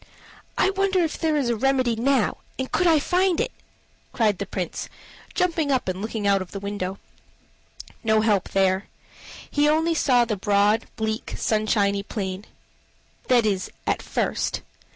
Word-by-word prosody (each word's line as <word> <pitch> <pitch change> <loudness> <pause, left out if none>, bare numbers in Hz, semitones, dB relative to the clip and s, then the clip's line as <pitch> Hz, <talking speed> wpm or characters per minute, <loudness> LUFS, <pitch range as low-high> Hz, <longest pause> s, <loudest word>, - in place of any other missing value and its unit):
"I - - +3
wonder 390 0 +1
is 325 -2 -1
there 315 -2 +1
a 245 -5 +1
remedy 255 0 +2
now, 250 0 +1 0.2
and 260 0 -4
could 360 - +2
I 325 -2 +6
find 360 +3 +2
it?" - - 0 0.6
cried 215 -5 +1
the 200 - -3
Prince, 185 -3 -4 0.5
jumping 335 -5 +1
up 260 -6 +1
and 185 +1 -2
looking 220 -1 -3
out 200 -1 +3
of 185 - -8
the 200 - -4
window. 200 -1 -4 1.1
No 220 -1 +3
help 210 -4 +1
there. 190 0 +1 0.6
He 295 0 +3
only 320 +2 +2
saw 250 -6 +3
the 225 -2 -1
broad, 205 +3 +2
bleak, 220 0 -3
sunshiny 210 -2 +1
plain 195 -1 -5 0.8
that 245 -3 +4
is, 195 -3 0 0.2
at - - 0
first. - - -2
220 Hz, 150 wpm, -24 LUFS, 200-290 Hz, 1.1 s, I